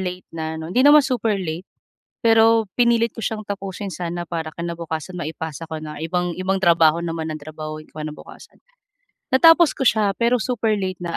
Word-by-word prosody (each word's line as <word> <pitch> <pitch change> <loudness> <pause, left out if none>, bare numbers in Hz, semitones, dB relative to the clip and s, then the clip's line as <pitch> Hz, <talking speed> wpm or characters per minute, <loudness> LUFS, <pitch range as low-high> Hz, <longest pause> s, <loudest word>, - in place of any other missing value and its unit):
late 180 -1 -5
na 160 -1 -4
'no 160 - -6
hindi 250 - +3
naman 295 +1 +8
super 230 -5 0
late, 175 -1 -4 0.6
pero 225 -1 +5
pinilit 235 -2 +3
ko - - -8
siyang 215 -1 -3
tapusin 195 0 -5
sana 175 +1 -4
para 160 -2 -4
kinabukasan 170 0 -5
maipasa 160 -1 -5
ko 160 -1 -5
na 155 -1 -8
or - - -5
ibang 175 +1 -1
ibang 190 +1 0
trabaho 165 -2 +4
naman 165 -1 -3
'yung 155 - -6
trabahuin 155 0 -8
ko 155 - -10
ng 155 - -4
kinabukasan. 150 - -14 0.7
Natapos 330 +4 +6
ko 265 - -1
siya 210 -3 +3
pero 235 +1 +2
super 225 -2 0
late 190 -1 -3
na 170 - -3
180 Hz, 190 wpm, -21 LUFS, 160-220 Hz, 0.7 s, naman